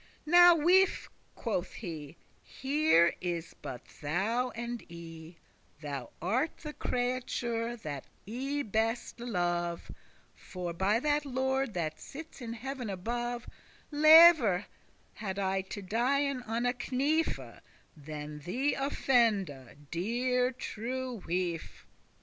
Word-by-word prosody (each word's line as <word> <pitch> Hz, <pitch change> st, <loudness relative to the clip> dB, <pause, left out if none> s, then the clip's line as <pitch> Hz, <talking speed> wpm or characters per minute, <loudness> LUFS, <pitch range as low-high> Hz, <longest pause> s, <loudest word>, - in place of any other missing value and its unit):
"Now, 350 Hz, +2 st, +8 dB
wife," 365 Hz, +5 st, +3 dB, 0.2 s
quoth 190 Hz, -5 st, -2 dB
he, 160 Hz, -6 st, -7 dB, 0.2 s
"here 270 Hz, -, +3 dB
is 175 Hz, -2 st, -3 dB
but 125 Hz, -1 st, -7 dB, 0.2 s
thou 205 Hz, +12 st, 0 dB
and 235 Hz, 0 st, -4 dB
I; 165 Hz, 0 st, -10 dB, 0.4 s
Thou 140 Hz, -5 st, -5 dB
art 245 Hz, -, 0 dB
the 300 Hz, -1 st, -5 dB
creature 245 Hz, -2 st, -2 dB
that 145 Hz, -, -6 dB, 0.2 s
I 270 Hz, +6 st, -2 dB
beste 225 Hz, +3 st, -1 dB
love: 175 Hz, -6 st, -2 dB, 0.4 s
For, 180 Hz, -2 st, -6 dB
by 195 Hz, +6 st, +2 dB
that 295 Hz, 0 st, +1 dB
Lord 265 Hz, -3 st, -1 dB
that 160 Hz, -3 st, -2 dB
sits 310 Hz, -1 st, -10 dB
in 230 Hz, -1 st, -5 dB
heav'n 250 Hz, 0 st, -5 dB
above, 240 Hz, +5 st, -3 dB, 0.4 s
Lever* 305 Hz, -, +8 dB
I -, -, -19 dB
had 190 Hz, -1 st, -1 dB
to 205 Hz, -, -6 dB
dien 260 Hz, +6 st, +1 dB
on 230 Hz, +2 st, -1 dB
a 245 Hz, -, +2 dB, 0.2 s
knife, 300 Hz, +5 st, +2 dB
*rather -, -, -12 dB, 0.3 s
Than 150 Hz, 0 st, -7 dB
thee 250 Hz, -, 0 dB
offende, 215 Hz, -, +1 dB
deare 250 Hz, +8 st, +1 dB
true 250 Hz, 0 st, -5 dB
wife. 175 Hz, -1 st, -3 dB
230 Hz, 115 wpm, -31 LUFS, 175-265 Hz, 0.4 s, Now